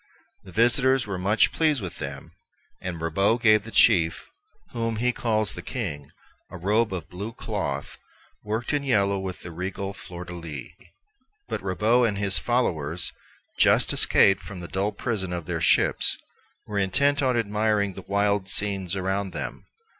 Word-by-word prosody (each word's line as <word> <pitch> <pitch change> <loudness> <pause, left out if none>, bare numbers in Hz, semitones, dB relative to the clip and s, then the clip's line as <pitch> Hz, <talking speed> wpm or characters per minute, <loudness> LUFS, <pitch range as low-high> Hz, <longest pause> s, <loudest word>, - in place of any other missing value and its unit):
Their 95 - -13
visitors 130 +3 +3
were 95 -3 -4
much 100 +4 +3
pleased 155 -4 +2
with 90 -5 -7
them, 70 0 -7 0.5
and 90 -2 -5
Ribaut 100 +9 +1
gave 110 -2 +5
the - - -8
chief, 85 -8 +4 0.5
whom 115 -1 -2
he 125 +3 +1
calls 110 -4 0
the 90 - -7
king, 90 - -5 0.4
a - - -8
robe 105 +5 +1
of 90 -4 -5
blue 100 +6 -6
cloth, - - -4 0.4
worked 110 +5 -2
in 145 - +1
yellow 100 -7 +2
with 95 -1 -5
the 85 - -7
regal 95 +3 -4
fleur 90 -2 -9
de 85 - -8
lis. 80 -6 -7 0.8
But - - -3
Ribaut 110 +6 +2
and 100 -3 -2
his 100 -4 +2
followers, 85 - -1 0.5
just - - +4
escaped 95 -1 +5
from 90 +1 -9
the 85 - -7
dull 100 +4 -1
prison 100 -3 -3
of 85 -2 -4
their 85 -1 -3
ships, - - +3 0.5
were 105 -1 -2
intent 140 +9 +2
on 130 -3 +2
admiring 105 -2 +1
the - - -8
wild 100 -1 0
scenes 95 -3 0
around 95 0 -2
them. - - -5
100 Hz, 160 wpm, -25 LUFS, 90-115 Hz, 0.8 s, gave